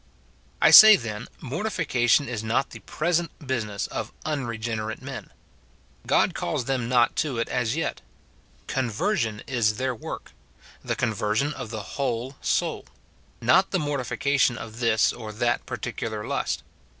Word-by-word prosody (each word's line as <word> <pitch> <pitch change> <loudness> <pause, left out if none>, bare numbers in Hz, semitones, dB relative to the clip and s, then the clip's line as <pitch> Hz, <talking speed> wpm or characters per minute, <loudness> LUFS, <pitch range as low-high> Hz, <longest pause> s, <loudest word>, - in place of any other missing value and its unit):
I - - +7
say, 215 -1 +12
then, 110 - -5
mortification 145 - +1
is 115 -3 -4
not 115 +5 0
the - - -9
present 170 +1 -1
business 115 -8 -3
of - - -5
unregenerate 115 -6 -3
men. - - -8 0.8
God - - +3
calls 100 +8 -2
them 125 -3 -1
not 120 -1 +3
to 145 -6 0
it 115 - -1
as 120 0 0
yet; 165 - -2 0.6
conversion 120 - -1
is 115 -5 +1
their 130 0 -1
work, 110 - -8 0.3
— - - -23
the - - -2
conversion 110 +4 0
of 125 -6 -7
the 110 -2 -5
whole 130 +3 -3
soul, - - -1 0.3
— - - -33
not 175 +12 +4
the 190 - 0
mortification 140 -4 0
of 110 +1 -8
this 115 -2 +3
or 110 -3 -7
that 120 +2 -1
particular 110 -2 -4
lust. - - -2
120 Hz, 145 wpm, -25 LUFS, 110-140 Hz, 0.8 s, say